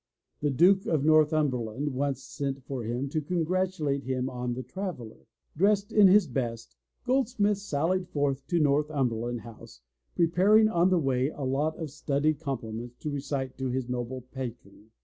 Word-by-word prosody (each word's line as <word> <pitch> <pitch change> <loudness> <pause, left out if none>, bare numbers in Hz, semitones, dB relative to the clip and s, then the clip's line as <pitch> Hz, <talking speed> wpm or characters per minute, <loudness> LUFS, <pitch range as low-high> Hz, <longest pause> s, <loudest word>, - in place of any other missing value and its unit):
The 145 - +1
Duke 180 +8 +4
of 150 -3 +1
Northumberland 150 -4 +2
once 135 0 -2
sent 135 0 -4
for 130 -2 -5
him 120 +5 -2
to 155 +2 -1
congratulate 170 -3 -1
him 130 0 -2
on 125 -1 -3
The 130 - -5
Traveller. 175 - -7 0.3
Dressed 200 +4 +2
in 210 -2 +7
his 195 +1 +6
best. 115 - -4 0.3
Goldsmith 245 -6 +1
sallied 180 0 -1
forth 140 -2 -1
to 175 - +1
Northumberland 135 -6 0
House, 110 - -13 0.3
pre 170 - +4
paring 205 +6 +4
on 175 -2 +3
the 185 - +3
way 135 -3 +1
a 150 - -7
lot 145 +4 0
of 160 -4 -5
studied 150 0 0
compliments 120 -5 -5
to 150 - -3
recite 135 -2 -4
to 130 -1 -1
his 125 0 -2
noble 125 +1 -3
patron. 120 -5 -9
140 Hz, 160 wpm, -28 LUFS, 125-170 Hz, 0.3 s, in